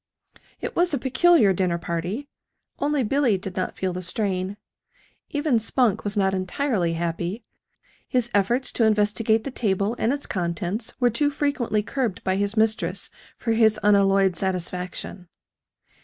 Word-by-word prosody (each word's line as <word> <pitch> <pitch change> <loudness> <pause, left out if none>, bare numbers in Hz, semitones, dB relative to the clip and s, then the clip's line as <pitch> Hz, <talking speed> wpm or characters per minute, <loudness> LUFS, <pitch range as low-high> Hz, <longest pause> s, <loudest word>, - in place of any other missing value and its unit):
It - - -4
was 350 -3 +3
a - - 0
peculiar 265 - +4
dinner 180 -2 0
party. 175 - -4 0.5
Only 290 -1 +1
Billy 245 -2 +2
did 185 0 -7
not 185 - -3
feel 185 -1 -1
the 180 - -4
strain. 190 +1 -2 0.7
Even 290 -5 +1
Spunk 225 -1 +1
was 205 +1 -1
not 190 -1 +2
entirely 185 -1 0
happy 170 +6 -3 0.6
his 250 -3 +1
efforts 235 +7 +1
to 235 - +1
investigate 220 +1 +2
the 275 - -5
table 205 -2 0
and 225 - +2
its 285 +1 -3
contents 180 +4 -3
were 245 -2 +3
too 290 +6 +2
frequently 280 -7 0
curbed 235 -4 -2
by 185 - +1
his 200 +2 -1
mistress 220 +1 +1 0.3
for 230 - -2
his 220 -1 +4
unalloyed 195 -2 +4
satisfaction. 180 0 -4
210 Hz, 145 wpm, -24 LUFS, 185-245 Hz, 0.7 s, peculiar